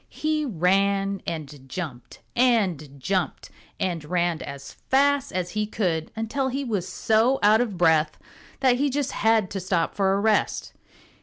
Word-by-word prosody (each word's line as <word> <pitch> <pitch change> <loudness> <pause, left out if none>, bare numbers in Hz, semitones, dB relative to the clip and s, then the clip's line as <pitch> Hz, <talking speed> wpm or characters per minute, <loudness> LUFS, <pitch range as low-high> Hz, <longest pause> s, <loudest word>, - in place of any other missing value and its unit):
He 310 0 -1
ran 195 - +1
and 145 -4 -6
jumped 140 -7 -7
and 185 - +1
jumped 185 +4 -2 0.3
and 175 -4 -1
ran 175 +1 0
as 140 0 -8 0.2
fast 280 +1 +3
as 180 -1 -2
he 210 +1 -1
could 175 -7 -1
until 225 +5 -1
he 270 +2 -2
was 205 -8 -2
so 225 +7 +2
out 215 +2 +6
of 215 -7 -2
breath 160 -3 +3 0.4
that 255 -2 +4
he 285 +2 +1
just 280 0 -1
had 220 -3 +2
to 195 - -3
stop 180 -2 0
for 195 -1 +2
a - - 0
rest. 215 0 +1
195 Hz, 155 wpm, -25 LUFS, 170-235 Hz, 0.4 s, out